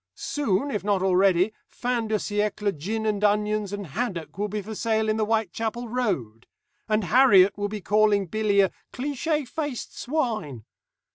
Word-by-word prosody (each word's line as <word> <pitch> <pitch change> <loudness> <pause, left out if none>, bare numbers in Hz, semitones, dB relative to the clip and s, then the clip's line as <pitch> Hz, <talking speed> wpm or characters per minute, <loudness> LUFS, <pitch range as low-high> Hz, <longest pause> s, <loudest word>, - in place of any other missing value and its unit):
Soon, 280 -2 -1
if 210 - -2
not 200 -2 +1
already, 190 +1 +3
fin 240 -2 -2
de 215 - 0
siècle 210 -1 -1
gin 215 +9 -3
and 210 -1 0
onions 210 0 +1
and 205 -1 -4
haddocks 180 - -4
will 205 +3 -1
be 210 +1 -3
for 220 +3 -7
sale 220 0 0
in 215 - +1
the 215 - +1
Whitechapel 225 +2 -1
road, 165 - -2 0.4
and 215 0 +2
Harriet 200 -3 +6
will 205 0 -2
be 210 0 -5
calling 210 0 +3
Billy 205 +2 +2
a 190 - +2 0.2
"cliché 290 +2 -2
faced 290 -4 -5
swine." 220 - -2
210 Hz, 160 wpm, -25 LUFS, 195-225 Hz, 0.4 s, Harriet